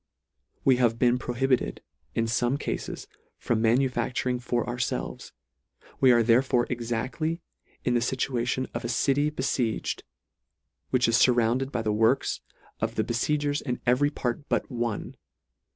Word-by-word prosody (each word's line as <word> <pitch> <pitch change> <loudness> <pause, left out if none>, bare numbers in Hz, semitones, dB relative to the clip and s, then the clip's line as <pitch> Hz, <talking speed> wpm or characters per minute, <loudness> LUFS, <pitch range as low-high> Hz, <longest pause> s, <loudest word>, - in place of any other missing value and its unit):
We 130 -2 +5
have 120 -2 +2
been 125 0 +3
prohibited, 130 +1 0 0.3
in 115 - +1
fome 120 +4 0
cafes, - - -4 0.3
from 115 -2 0
manufacturing 125 +1 +1
for 120 -1 -1
ourfelves; 120 - -3 0.7
We 130 - +6
are 120 -1 +5
therefore 120 +1 +3
exactly 125 +7 -2 0.5
in 125 - +2
the 120 - +3
iituation 130 +1 -1
of 120 - -4
a 120 - -3
city 140 +4 +2
befieged, 130 -6 -1 0.9
which 125 -2 +3
is 115 -2 +3
furrounded 125 +2 +3
by 120 -4 -2
the 105 -1 0
works 115 +5 +2 0.4
of 110 +1 -2
the 110 - +1
befiegers 145 +5 0
in 125 -3 -3
every 130 +4 +3
part 140 0 -3
but - - 0
one. 120 -3 -3
125 Hz, 135 wpm, -27 LUFS, 115-130 Hz, 0.9 s, We